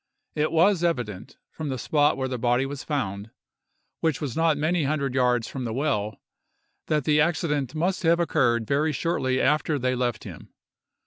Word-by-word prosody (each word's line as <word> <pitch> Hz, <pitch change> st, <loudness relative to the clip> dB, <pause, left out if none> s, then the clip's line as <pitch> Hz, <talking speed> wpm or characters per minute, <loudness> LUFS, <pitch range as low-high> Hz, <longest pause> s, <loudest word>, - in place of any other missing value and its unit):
It 155 Hz, +1 st, 0 dB
was 175 Hz, +2 st, +3 dB
evident, 125 Hz, -, -2 dB
from 155 Hz, -2 st, -5 dB
the 130 Hz, -, -2 dB
spot 145 Hz, +4 st, +2 dB
where 130 Hz, -1 st, -1 dB
the 125 Hz, -2 st, -4 dB
body 120 Hz, +2 st, +2 dB
was 140 Hz, 0 st, -6 dB
found, 105 Hz, -8 st, -3 dB, 0.7 s
which 160 Hz, -3 st, 0 dB
was 145 Hz, -6 st, -4 dB
not 165 Hz, -2 st, +2 dB
many 155 Hz, +1 st, +1 dB
hundred 140 Hz, -2 st, -1 dB
yards 125 Hz, -3 st, +2 dB
from 130 Hz, -, -5 dB
the 115 Hz, -2 st, -3 dB
well, 115 Hz, -8 st, -1 dB, 0.7 s
that 150 Hz, -2 st, +1 dB
the 150 Hz, +2 st, +3 dB
accident 150 Hz, -4 st, 0 dB
must 180 Hz, +4 st, 0 dB
have 170 Hz, 0 st, +3 dB
occurred 120 Hz, -9 st, +1 dB
very 150 Hz, +5 st, +1 dB
shortly 130 Hz, -4 st, 0 dB
after 150 Hz, +2 st, +2 dB
they 130 Hz, -1 st, 0 dB
left 120 Hz, -3 st, -2 dB
him. -, -, -10 dB
140 Hz, 175 wpm, -25 LUFS, 125-155 Hz, 0.7 s, was